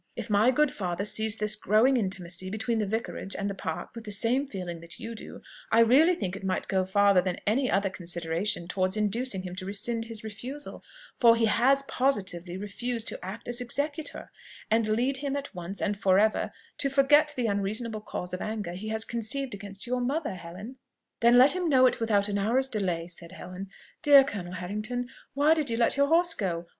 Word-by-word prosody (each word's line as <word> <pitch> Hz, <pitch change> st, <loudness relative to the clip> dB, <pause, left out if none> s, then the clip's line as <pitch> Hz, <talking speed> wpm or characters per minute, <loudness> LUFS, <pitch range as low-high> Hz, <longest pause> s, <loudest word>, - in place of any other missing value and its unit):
If 225 Hz, -, -6 dB
my 210 Hz, +4 st, +4 dB
good 295 Hz, +2 st, +3 dB
father 180 Hz, 0 st, -3 dB
sees 220 Hz, +1 st, +2 dB
this 210 Hz, 0 st, +1 dB
growing 215 Hz, +6 st, +3 dB
intimacy 185 Hz, -4 st, -1 dB
between 220 Hz, +3 st, -1 dB
the 210 Hz, -, -1 dB
Vicarage 220 Hz, -2 st, -3 dB
and 200 Hz, -, -2 dB
the 200 Hz, -, -2 dB
Park 160 Hz, -4 st, -5 dB
with 230 Hz, -, -8 dB
the 210 Hz, -, -6 dB
same 240 Hz, +7 st, +1 dB
feelings 180 Hz, -7 st, -6 dB
that 170 Hz, 0 st, -6 dB
you 230 Hz, +1 st, -6 dB
do, 220 Hz, -, -10 dB, 0.3 s
I 230 Hz, -, +6 dB
really 285 Hz, +10 st, +5 dB
think 190 Hz, -, -3 dB
it 195 Hz, -, -9 dB
might 190 Hz, -1 st, -2 dB
go 190 Hz, -1 st, +1 dB
farther 200 Hz, 0 st, +4 dB
than 180 Hz, -1 st, -2 dB
any 250 Hz, +5 st, +1 dB
other 195 Hz, 0 st, +1 dB
consideration 170 Hz, +1 st, -2 dB
towards 185 Hz, +2 st, 0 dB
inducing 210 Hz, -1 st, 0 dB
him 180 Hz, -1 st, -6 dB
to 185 Hz, -, -5 dB
rescind 225 Hz, +3 st, -1 dB
his 225 Hz, -1 st, -6 dB
refusal 250 Hz, +7 st, -6 dB, 0.4 s
for 230 Hz, -2 st, +7 dB
he 230 Hz, 0 st, +2 dB
has 265 Hz, +5 st, +3 dB
positively 190 Hz, -11 st, -1 dB
refused 230 Hz, +4 st, -3 dB
to -, -, -7 dB
act 190 Hz, +5 st, -7 dB
as 240 Hz, 0 st, -1 dB
executor 290 Hz, +5 st, -3 dB, 0.4 s
and 225 Hz, 0 st, +3 dB
lead 245 Hz, +5 st, +1 dB
him 280 Hz, 0 st, -3 dB
at 285 Hz, 0 st, -5 dB
once 180 Hz, +2 st, -6 dB
and 205 Hz, 0 st, 0 dB
for 195 Hz, -2 st, +3 dB
ever 215 Hz, +2 st, +2 dB, 0.3 s
to 275 Hz, -, +2 dB
forget 290 Hz, +2 st, +4 dB
the 245 Hz, -, 0 dB
unreasonable 215 Hz, +2 st, -2 dB
cause 180 Hz, -3 st, -6 dB
of 185 Hz, -, -4 dB
anger 215 Hz, -5 st, -4 dB
he 195 Hz, +5 st, -7 dB
has 220 Hz, 0 st, -1 dB
conceived 235 Hz, +3 st, -1 dB
against 200 Hz, +1 st, -7 dB
your 250 Hz, +1 st, -1 dB
mother, 280 Hz, +1 st, -1 dB
Helen." 185 Hz, +8 st, -9 dB, 0.4 s
"Then 235 Hz, +1 st, +5 dB
let 260 Hz, +3 st, +7 dB
him 360 Hz, -2 st, -1 dB
know 260 Hz, -3 st, +5 dB
it 255 Hz, -, +2 dB
without 210 Hz, -3 st, +2 dB
an 200 Hz, -1 st, -1 dB
hour's 245 Hz, +6 st, +2 dB
delay," 180 Hz, -8 st, -2 dB
said 170 Hz, -1 st, -9 dB
Helen. 185 Hz, +2 st, -8 dB, 0.3 s
"Dear 285 Hz, -2 st, +8 dB
Colonel 195 Hz, -9 st, -6 dB
Harrington! 215 Hz, +7 st, -3 dB, 0.3 s
why 290 Hz, +3 st, +5 dB
did 310 Hz, -4 st, 0 dB
you 230 Hz, -, -1 dB
let 235 Hz, -, +3 dB
your 280 Hz, 0 st, +3 dB
horse 335 Hz, +2 st, +3 dB
go? 175 Hz, -, -3 dB
215 Hz, 205 wpm, -28 LUFS, 190-250 Hz, 0.4 s, Dear